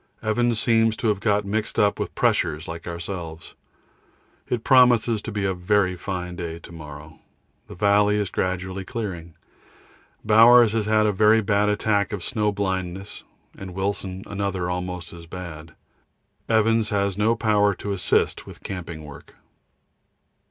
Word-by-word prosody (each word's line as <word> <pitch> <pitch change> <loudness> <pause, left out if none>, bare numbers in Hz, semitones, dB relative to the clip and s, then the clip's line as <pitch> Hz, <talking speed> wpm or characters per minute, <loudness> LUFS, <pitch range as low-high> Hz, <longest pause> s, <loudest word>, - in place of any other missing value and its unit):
Evans 115 +1 +1
seems 115 -1 +2
to 115 - 0
have 105 -2 0
got 105 -1 +1
mixed 110 +2 -2
up 100 0 +2
with - - -4
pressures 75 +1 0
like 85 +1 -7
ourselves. 85 -1 -6 1.0
It 120 -2 -1
promises 120 -4 +4
to 115 - -6
be 100 -2 -2
a 95 - +1
very 90 +1 +1
fine 90 -1 -5
day 85 -2 -5
to 85 - -13
morrow. 75 -1 -11 0.5
The - - -10
valley 105 +2 +3
is 105 -3 -2
gradually 95 +1 -2
clearing. 90 -7 -6 0.9
Bowers 115 +1 +7
has 110 -1 -1
had 110 0 +3
a 105 - +3
very 105 +3 +4
bad 105 0 +1
attack 105 -1 +1
of 95 -4 -4
snow 105 -1 0
blindness, 95 -1 -4 0.3
and 95 -2 -9
Wilson 95 -1 -3
another 100 -3 -3
almost 90 -1 -5
as 85 -1 -11
bad. 80 -3 -9 0.7
Evans 110 0 +2
has 100 -3 0
no 110 +3 +2
power 105 -3 +2
to 100 - -5
assist 100 -2 0
with - - -12
camping 85 -4 -6
work. 75 -2 -13
100 Hz, 150 wpm, -23 LUFS, 90-110 Hz, 1.0 s, Bowers